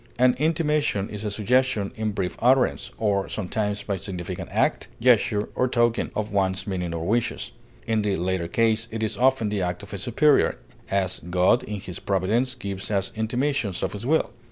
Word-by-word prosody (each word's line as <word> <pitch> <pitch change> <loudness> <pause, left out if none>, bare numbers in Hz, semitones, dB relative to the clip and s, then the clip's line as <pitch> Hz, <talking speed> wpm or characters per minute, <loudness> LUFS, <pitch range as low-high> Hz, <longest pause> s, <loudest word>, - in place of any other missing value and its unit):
An 125 +1 +5
intimation 150 - +1
is 105 0 -6
a 105 - -1
suggestion 110 0 +1
in 110 -1 -1
brief 95 -3 -2
utterance, 130 +1 +3
or 100 -3 0
sometimes 105 +1 -2
by 100 -2 -2
significant 90 -1 -6
act, - - +1
gesture, 110 -4 +3
or 130 - +1
token, 120 -2 +1
of 110 0 -3
one's 95 -1 0
meaning 90 -4 -3
or 85 0 -3
wishes; 115 +5 0 0.3
in 110 -2 +1
the 105 -2 0
latter 90 0 -1
case 115 +4 +1
it 110 0 -4
is 110 - -1
often 130 -3 +2
the 105 -2 -1
act 90 +2 -2
of 100 - -10
a 100 - -4
superior; 135 - +3 0.3
as, 95 -2 0
God 90 +7 +4
in 105 -3 -5
his 90 -2 -7
providence 110 +7 0
gives 100 -5 -5
us 100 -2 0
intimations 115 -2 -1
of - - -1
his 105 +1 -6
will. 160 +2 +2
105 Hz, 180 wpm, -25 LUFS, 95-120 Hz, 0.3 s, An